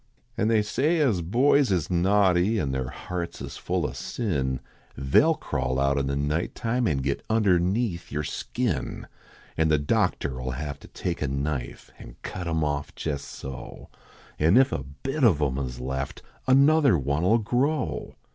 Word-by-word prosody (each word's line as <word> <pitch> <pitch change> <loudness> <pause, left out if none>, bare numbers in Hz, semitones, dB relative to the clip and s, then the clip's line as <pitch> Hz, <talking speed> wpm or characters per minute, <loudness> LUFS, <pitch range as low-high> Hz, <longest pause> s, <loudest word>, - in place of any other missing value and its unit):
An 105 - +1
they 110 -2 +3
say 140 +11 +1
as 125 - +2
boys 125 - +3
is 90 -2 0
naughty, 95 +2 +3
An 70 -9 -1
their 65 -2 -2
hearts 85 +4 -5
is - - -7
full - - -1
o - - -2
sin 70 - -2 0.4
They 65 - +4
ll 160 0 +3
crawl 65 - -2
out 70 +1 +2
in 70 - -1
the 70 - -1
night 75 +4 -1
time 120 0 0
An 70 -7 0
get 70 0 -1
underneath 100 -2 +1
yer 75 -1 -2
skin, 70 - -3 0.5
An 80 - +3
the 75 -1 +4
doctor 70 -2 0
11 65 0 -3
have 70 0 -5
to - - -14
take 85 -1 -4
a 75 - 0
knife 70 -1 -3
An - - -11
cut 90 -2 -5
em 80 -1 0
off 75 -1 -2
jes 70 -3 -2
so, 65 -2 -9 0.5
An 80 +8 +5
if 135 +1 +5
a 65 - -2
bit 135 - -4
of 95 - +5
em 70 -3 0
is 60 -2 -4
left 65 +2 -4 0.2
Another 140 - +5
one 70 +3 -1
11 110 +5 +3
grow. 140 +8 -1
85 Hz, 175 wpm, -26 LUFS, 70-110 Hz, 0.5 s, An